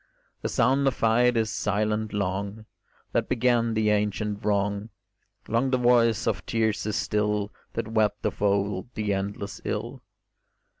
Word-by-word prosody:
The - - -2
sound 135 +4 +2
of 130 - +1
fight 120 +2 +3
is 110 -1 +1
silent 105 +1 -1
long 100 +2 -3 0.5
That - - 0
began 120 -2 +2
the 110 -1 +2
ancient 105 0 -1
wrong; 100 +1 0 0.6
Long 115 +4 +1
the 130 - +2
voice 120 -2 +3
of - - -1
tears 110 -2 0
is 110 - -1
still 105 -1 0 0.2
That - - -3
wept 105 -2 +1
of 105 - -2
old 100 0 +1
the 105 -2 0
endless 100 +1 -4
ill. - - -4
105 Hz, 145 wpm, -26 LUFS, 105-115 Hz, 0.6 s, fight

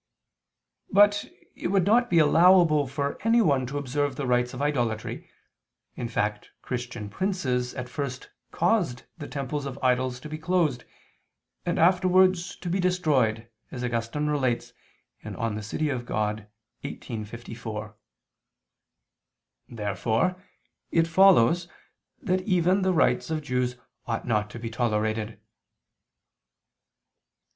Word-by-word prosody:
But 205 +1 +4 0.3
it - - -3
would 190 -1 +2
not 240 +4 +3
be 170 - +2
allowable 165 -1 +5
for 140 +2 -3
anyone 175 - +3
to 140 +3 -4
observe 145 0 -1
the 140 - -3
rites 125 0 +1
of 125 - -8
idolatry, 120 -7 -2 0.7
in 120 - -4
fact 105 -2 -2
Christian 120 -4 -5
princes 125 - -2
at 125 -1 -5
first 130 0 -5 0.2
caused 175 - 0 0.2
the 145 - -6
temples 140 +1 -4
of 135 -1 -6
idols 125 0 +1
to 155 - -8
be 155 0 -6
closed, 160 -7 0 0.8
and - - 0
afterwards, 185 +1 +3
to 180 - -9
be 180 +3 0
destroyed, 145 -12 +1 0.2
as 125 - -6
Augustine 120 +4 -2
relates 135 -5 -1 0.5
(De - - -6 0.3
Civ. 105 - -6 0.3
Dei 105 0 -2 0.3
xviii, 115 -5 -6
54). 110 -1 -7 1.7
Therefore 115 - -1 0.5
it 165 -1 +3
follows 175 -2 +5 0.5
that 185 -1 0
even 185 0 +2
the 190 0 +2
rites 170 - +2
of 155 -1 -2
Jews 125 -2 -1 0.3
ought 115 -2 -2
not 105 -3 0
to 110 - -9
be 115 -1 -6
tolerated. 110 -1 -1
140 Hz, 120 wpm, -26 LUFS, 120-175 Hz, 1.7 s, allowable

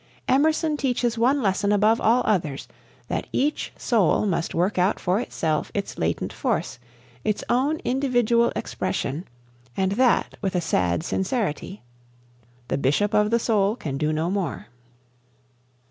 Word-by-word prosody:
Emerson 310 +3 +2
teaches 245 -4 0
one 255 +4 +2
lesson 200 +1 +1
above 215 +2 +3
all 235 +3 +3
others, 160 -10 -1 0.4
that - - -3
each 290 +3 -1
soul 215 -3 +2
must 170 -4 -1
work 180 +3 +1
out 185 +4 +2
for 185 +4 +1
itself 160 -9 -2
its 200 -1 -3
latent 80 +1 -1
force, - - -2 0.4
its 215 - -1
own 270 +6 +2
individual 245 -3 +2
expression, 150 +7 -3 0.5
and 190 0 +1
that 245 +4 +2
with 190 -2 -2
a - - +3
"sad 90 - 0
sincerity." 190 - -2 0.8
"The - - -1
bishop 175 +11 +1
of 210 0 +3
the 230 - +3
soul" 215 -3 +1
can 140 - -5
do 155 0 +1
no 160 +3 -1
more. 195 -3 -2
205 Hz, 140 wpm, -24 LUFS, 170-240 Hz, 0.8 s, above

